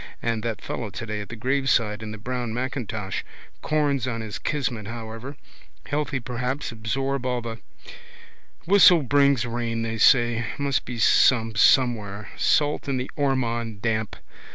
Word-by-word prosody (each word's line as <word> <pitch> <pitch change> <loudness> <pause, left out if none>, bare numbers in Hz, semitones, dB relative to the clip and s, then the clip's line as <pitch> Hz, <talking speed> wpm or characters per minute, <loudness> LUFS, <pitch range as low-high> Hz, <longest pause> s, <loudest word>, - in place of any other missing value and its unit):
And 115 -2 -1
that 110 -2 -4
fellow 115 -4 -4
today 105 0 -5
at 105 - -9
the 120 - -6
graveside 120 -3 +1
in 110 - -6
the 110 - -7
brown 120 0 -4
macintosh. 120 -6 -3 0.4
Corns 145 -4 0
on 115 -3 -3
his 110 -2 -6
kismet 120 -8 -2
however. 115 +4 -7 0.5
Healthy 145 -2 -2
perhaps 125 +4 -3
absorb 135 +4 -2
all 125 -1 -1
the. 115 -1 -6 1.1
Whistle 180 -3 +7
brings 140 -2 +3
rain 115 -1 -2
they 115 0 -3
say. 120 -1 +4
Must 140 -1 0
be 125 -1 -6
some 115 0 +4
somewhere. 105 -3 +2
Salt 150 -1 +1
in 135 - 0
the 125 +1 -4
Ormond 120 -6 -1
damp. 110 -2 -1
120 Hz, 145 wpm, -24 LUFS, 110-135 Hz, 1.1 s, Whistle